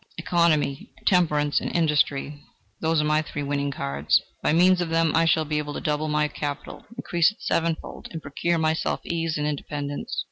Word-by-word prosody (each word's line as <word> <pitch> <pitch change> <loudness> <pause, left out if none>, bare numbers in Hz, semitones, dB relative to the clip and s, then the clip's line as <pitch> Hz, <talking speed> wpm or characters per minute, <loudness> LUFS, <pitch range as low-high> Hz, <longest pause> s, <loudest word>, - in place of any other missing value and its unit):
Economy, 170 -5 +1
temperance 150 -6 +3
and - - -3
industry: 150 -3 +1 0.4
those 160 0 +1
are - - +2
my 150 0 +2
three 145 -1 -5
winning 140 0 -1
cards; 70 - +1 0.2
by - - +2
means 180 +3 +4
of 175 - -2
them 165 -1 +2
I 165 - +4
shall 160 0 +3
be 150 0 -1
able 150 -1 -4
to - - -3
double 150 0 -1
my 150 0 +1
capital 145 0 -6
increase 175 -7 +2
it 215 - -20
sevenfold, 165 -1 -2
and 165 - -6
procure 160 +4 -1
for - - 0
myself 160 0 0
ease 165 -2 -1
and 150 - -1
independence." 145 -1 -4
155 Hz, 185 wpm, -25 LUFS, 145-165 Hz, 0.4 s, means